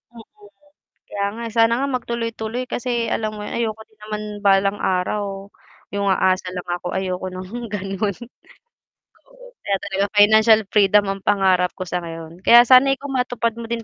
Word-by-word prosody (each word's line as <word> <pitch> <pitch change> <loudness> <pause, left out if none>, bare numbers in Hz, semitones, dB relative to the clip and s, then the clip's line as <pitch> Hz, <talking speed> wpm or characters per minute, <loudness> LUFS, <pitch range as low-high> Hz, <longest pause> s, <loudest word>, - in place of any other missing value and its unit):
Oo, 225 - -11 0.9
kaya 200 0 -2
nga 235 - -6
sana 225 0 +4
nga 275 - -1
mag 250 - -2
tuloy-tuloy, 230 +1 -3
kasi 240 -1 -2
alam 215 -1 -2
mo 210 - -8
yun - - -6
ayoko 220 -2 -2
din 215 -1 -31
naman 210 0 -5 0.2
balang 195 +1 +3
araw, 195 +1 -2 0.5
yung 200 0 -1
aasa 185 -1 +1
lang 180 0 -7
ako, 175 0 -3
ayoko 185 -1 -3
ng 190 +6 -7
ganun. 200 -1 -3 1.5
Kaya 195 -1 0
talaga 195 0 -1
financial 220 +1 +6
freedom 205 0 +4
ang 195 -1 -5
pangarap 190 -3 +2
ko 185 - -5
sa 180 +1 -2
ngayon, 165 0 -9
kaya 240 0 +9
sana 260 +2 +6
ikaw 280 +1 -7
matupad 245 -3 -1
mo 230 - -6
din 230 -1 -3
205 Hz, 165 wpm, -21 LUFS, 190-230 Hz, 1.5 s, kaya